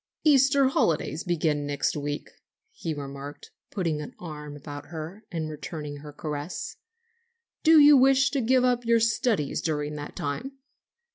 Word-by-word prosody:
"Easter 275 -2 +5
holidays 160 - 0
begin 155 -4 0
next 145 -1 0
week," 145 0 -4 0.4
he 175 - -5
remarked, 140 -1 -7 0.2
putting 165 -6 -2
an 150 - -9
arm 150 -3 -8
about 145 0 -8
her 165 +6 -7
and 160 -3 -3
returning 150 -1 -6
her 150 +1 -10
caress; 150 +2 -5 0.9
"do 320 -1 +7
you 295 0 +9
wish 270 +1 +5
to 275 - 0
give 255 +2 +3
up 245 -1 +2
your 230 0 +3
studies 225 - +1
during 150 -2 -2
that 145 0 -7
time?" 190 - -4
160 Hz, 145 wpm, -27 LUFS, -, 0.9 s, you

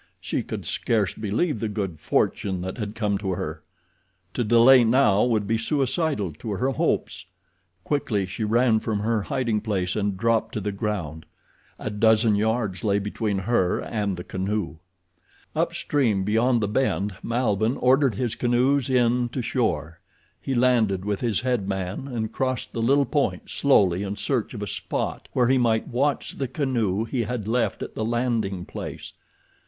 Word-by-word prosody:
She - - -2
could - - -6
scarce 105 -4 0
believe 110 - -1
the 110 - -2
good 95 -6 -4
fortune 95 +3 0
that 95 +5 -5
had 105 -1 -4
come 105 -3 0
to 95 -3 -2
her. - - -5 0.7
To 120 - 0
delay 120 +3 +7
now 110 -4 +4
would 110 -4 +1
be 110 +2 0
suicidal 135 - 0
to 110 - -4
her 125 +7 0
hopes. - - -1 0.6
Quickly 110 -9 0
she 95 +4 -5
ran 115 +1 +3
from 105 -2 -2
her 110 0 +1
hiding 115 0 -1
place 95 -5 -1
and 100 -2 -1
dropped 115 +2 +1
to - - 0
the 105 0 -2
ground. 100 -7 -4 0.5
A 110 - -4
dozen 110 +1 +3
yards 105 -3 0
lay 100 -2 +2
between 105 0 -2
her 95 -2 +1
and 100 -4 -2
the 90 - -6
canoe. 95 -4 -3 0.8
Up - - +1
stream, 115 -10 +1
beyond 115 +4 +2
the 105 - 0
bend, 100 -4 0
Malbihn 115 -1 0
ordered 130 -2 +3
his 120 +1 -1
canoes 125 +3 +1
in 125 -1 +2
to 125 +1 -4
shore. 85 - -1 0.4
He 135 - -2
landed 115 -6 +2
with 105 -1 -2
his 115 -5 0
head 125 -6 -1
man 95 +6 -3
and 115 -4 -3
crossed 130 0 -2
the 115 - -3
little 140 +4 +3
point 145 -1 -1
slowly 95 -10 +3
in 100 0 -3
search 115 +3 -2
of 105 - -4
a - - -2
spot - - -3
where 125 - +3
he 130 +1 +3
might 115 -2 +1
watch 140 +4 0
the 135 - -1
canoe 120 -7 0
he 120 +1 -2
had 115 -2 -3
left 120 +2 0
at - - -7
the 110 - -3
landing 115 -5 -1
place. - - -7
110 Hz, 170 wpm, -24 LUFS, 100-125 Hz, 0.8 s, delay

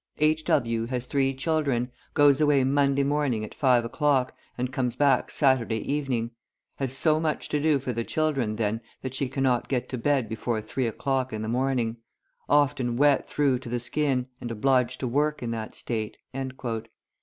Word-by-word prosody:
"H. 155 +1 +2
W. 115 -4 +1
has 125 0 -3
three 135 0 +1
children, 135 -4 0 0.2
goes 145 -1 +5
away 145 -3 +4
Monday 140 +1 +2
morning 140 -6 0
at - - -11
five 125 -4 +3
o'clock, 135 0 +1 0.2
and 125 +1 -2
comes 125 -4 -1
back 140 -1 +3
Saturday 130 -6 +2 0.2
evening; 125 -6 -1 0.5
has 135 -1 -2
so 155 +1 +3
much 155 -1 -1
to 150 - 0
do 155 -1 +3
for 130 -2 -3
the 115 0 -2
children 135 -7 0
then 110 +1 -1 0.2
that 130 -1 -4
she 130 0 -1
cannot 130 -2 +1
get 125 -2 -1
to 130 - -4
bed 135 -1 +1
before 110 +1 -2
three 120 +4 -2
o'clock 130 +3 -1
in 110 0 -4
the - - -3
morning; 120 -1 0 0.5
often 140 -4 +2
wet 145 0 +3
through 140 -4 +2
to 120 - -9
the 120 +1 -1
skin, 130 +1 0 0.2
and 120 - -5
obliged 125 +2 +1
to 130 - -1
work 150 +3 0
in 115 - -2
that 110 -1 -5
state." 110 -3 -4
130 Hz, 180 wpm, -26 LUFS, 120-145 Hz, 0.5 s, goes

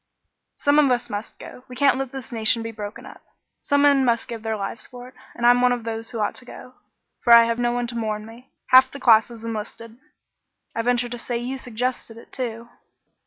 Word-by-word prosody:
"Some 285 +1 +3
of 290 -3 +4
us 245 -2 -1
must 205 +2 -6
go; 250 - -12
we 250 - -10
can't 275 0 +3
let 270 -2 -4
this 270 -2 -8
nation 225 0 +2
be 225 - -5
broken 210 -1 -8
up. - - -13 0.4
Some 285 0 +2
men 280 -2 +5
must 235 -2 +1
give 230 -2 -7
their 220 0 -3
lives 200 +2 -3
for 245 0 -11
it; - - -22 0.2
and 235 - -2
I'm 245 +1 +6
one 250 0 +4
of 245 -2 -2
those 225 0 -5
who 235 - -6
ought 210 - -1
to - - -10
go, 250 0 -12 0.5
for 240 - +3
I 235 0 +9
have 230 0 -2
no 240 0 +1
one 245 0 -1
to 240 0 -7
mourn 215 -2 -3
for 225 - -11
me. 245 +3 -16 0.2
Half 260 +1 +7
the 280 - -9
class 225 -4 +5
has 230 -2 -12
enlisted." 230 +1 -7 0.8
"I 230 - 0
venture 245 +1 +1
to 240 0 -6
say 240 0 -3
you 245 +3 -4
suggested 245 -2 -4
it, 230 - -15
too?" 235 -2 -5
240 Hz, 235 wpm, -23 LUFS, 225-250 Hz, 0.8 s, I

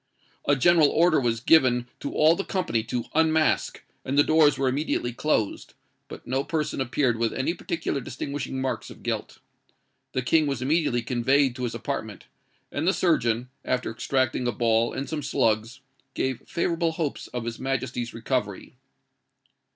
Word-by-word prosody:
A 145 - +4
general 155 +2 +5
order 170 0 +4
was 120 -3 0
given 125 -3 +4
to 140 - -4
all 155 +2 +4
the 195 - -3
company 180 - -1
to 120 0 -3
unmask, 160 0 +2 0.2
and 135 +2 -2
the 145 - +7
doors 155 -2 +4
were 135 - +1
immediately 130 -2 -1
closed; 120 -5 -1 0.3
but - - -10
no 130 +2 -1
person 155 -3 -2
appeared 125 -2 0
with 115 -1 +1
any 135 +6 -1
particular 160 -5 -3
distinguishing 135 +2 -5
marks 130 0 -3
of - - -13
guilt. - - -3 0.8
The 130 - -1
King 155 +4 +3
was 135 -4 -2
immediately 130 -3 +1
conveyed 130 +2 +2
to 125 - -2
his 115 - -4
apartment; - - -5 0.5
and 155 +4 -2
the 190 - +4
surgeon, 120 -8 +1
after 125 -2 -1
extracting 125 +2 0
a - - +2
ball 115 -1 +2
and 140 - -4
some 155 -2 -3
slugs, 115 0 0 0.3
gave 130 -1 -2
favourable 170 -1 0
hopes 160 -4 -3
of 120 -2 -5
his 115 0 -5
Majesty's 130 -2 -2
recovery. 115 -4 -3
130 Hz, 160 wpm, -25 LUFS, 120-155 Hz, 0.8 s, the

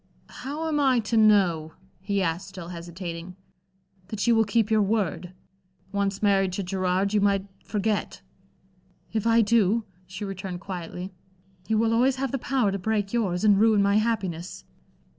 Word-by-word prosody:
"How 300 +4 -5
am 305 -2 0
I 265 -3 +3
to 225 +2 -2
know," 190 -8 +3 0.3
he 200 +1 -1
asked, 170 +3 -2
still 185 -3 -9
hesitating 170 0 -7 0.7
"that 205 0 -3
you 235 -1 +4
will 225 0 +4
keep 215 +1 +1
your 215 -1 +4
word? 195 -4 -1 0.6
Once 200 0 -1
married 195 -2 +3
to 195 - -2
Gerard, 185 +1 0
you 210 - +3
might 200 -1 +2 0.2
forget." 210 0 -2 0.9
"If 220 0 0
I 230 0 +5
do," 225 0 +3 0.2
she 190 +2 -6
returned 190 -2 -5
quietly, 180 0 -6 0.6
"you 220 - +1
will 225 +1 +2
always 255 +3 +3
have 270 -1 -2
the 270 - -2
power 245 -5 +1
to 195 - -3
break 205 +1 -1
yours 195 -6 0
and 205 -2 +5
ruin 215 -2 +4
my 200 +1 +3
happiness." 195 -6 -2
200 Hz, 160 wpm, -26 LUFS, 185-225 Hz, 0.9 s, I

